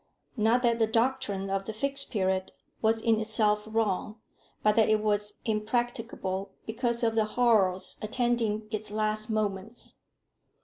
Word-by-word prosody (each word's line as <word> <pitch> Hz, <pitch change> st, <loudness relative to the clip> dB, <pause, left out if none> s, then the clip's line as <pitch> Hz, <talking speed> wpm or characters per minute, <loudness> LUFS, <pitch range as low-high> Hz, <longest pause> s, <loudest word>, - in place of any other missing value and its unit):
Not 230 Hz, +2 st, +2 dB
that 235 Hz, -1 st, +2 dB
the 225 Hz, -, +3 dB
doctrine 220 Hz, -5 st, 0 dB
of 195 Hz, 0 st, -1 dB
the 220 Hz, -, -4 dB
Fixed 275 Hz, +5 st, 0 dB
Period 190 Hz, -3 st, 0 dB, 0.3 s
was 225 Hz, 0 st, +2 dB
in 225 Hz, -1 st, +3 dB
itself 215 Hz, -1 st, +2 dB
wrong, 215 Hz, 0 st, -1 dB, 0.4 s
but 210 Hz, 0 st, +4 dB
that 220 Hz, -1 st, +4 dB
it 215 Hz, 0 st, +4 dB
was 210 Hz, -1 st, 0 dB
impracticable 215 Hz, -3 st, -2 dB
because 235 Hz, +1 st, -1 dB
of 225 Hz, -1 st, +2 dB
the 220 Hz, -1 st, +2 dB
horrors 215 Hz, -5 st, +2 dB
attending 220 Hz, -1 st, 0 dB
its 215 Hz, -1 st, -4 dB
last 215 Hz, +1 st, -1 dB
moments. 215 Hz, +1 st, -3 dB
215 Hz, 140 wpm, -28 LUFS, 210-230 Hz, 0.4 s, but